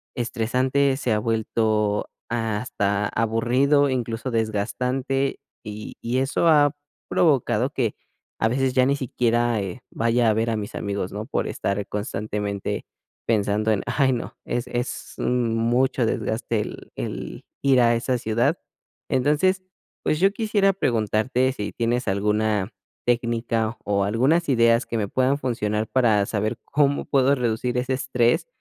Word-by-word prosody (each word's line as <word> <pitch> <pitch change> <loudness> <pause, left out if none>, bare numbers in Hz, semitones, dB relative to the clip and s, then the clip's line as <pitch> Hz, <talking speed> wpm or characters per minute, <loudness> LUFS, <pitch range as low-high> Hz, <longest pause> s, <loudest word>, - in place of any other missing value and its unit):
estresante, 130 +4 +1
se 130 -3 -2
ha 105 - +2
vuelto 110 -2 0 0.2
hasta 105 -3 -1
aburrido, 125 +6 +2
incluso 120 0 -2
desgastante. 125 +6 -1 0.2
Y 105 0 -8
y 120 +2 -1
eso 135 +5 +1
ha 145 -2 +5 0.4
provocado 130 -6 +2
que 120 -5 -1 0.4
a 110 - +3
veces 130 +2 0
ya 130 0 +4
ni 140 +1 +2
siquiera, 120 -3 0
eh, 95 +4 -6
vaya 115 0 +2
a - - +3
ver 115 +2 0
a 115 - 0
mis 105 -1 -5
amigos, 100 -2 -3
¿no? 105 +2 -5
Por - - -2
estar 100 0 -2
constantemente 105 -1 -3 0.4
pensando 105 0 +1
en: 105 - 0
"Ay 130 -2 +2
no, 120 - -5
es 120 +1 -2
es 120 +1 -4
mucho 120 +1 +1
desgaste 110 0 -1
el - - -8
el - - -6 0.2
ir 135 -3 +4
a 120 0 +4
esa 125 +2 0
ciudad". 115 0 +1 0.5
Entonces, 150 +8 +2 0.4
pues, 155 - 0
yo 195 +1 +5
quisiera 210 -3 +2
preguntarte 120 - +1
si 105 -5 -5
tienes 120 0 -1
alguna 105 +1 +1 0.3
técnica 115 -1 0
o 100 -1 +1
algunas 130 - +2
ideas 115 -2 +4
que 115 - -3
me 105 -2 -1
puedan 130 +2 +2
funcionar 110 -5 -1
para 110 -6 +3
saber 110 +2 -2
cómo 145 -1 +1
puedo 140 0 +3
reducir 125 0 -1
ese 125 +1 -1
estrés 125 - +1
120 Hz, 140 wpm, -24 LUFS, 110-130 Hz, 0.5 s, ha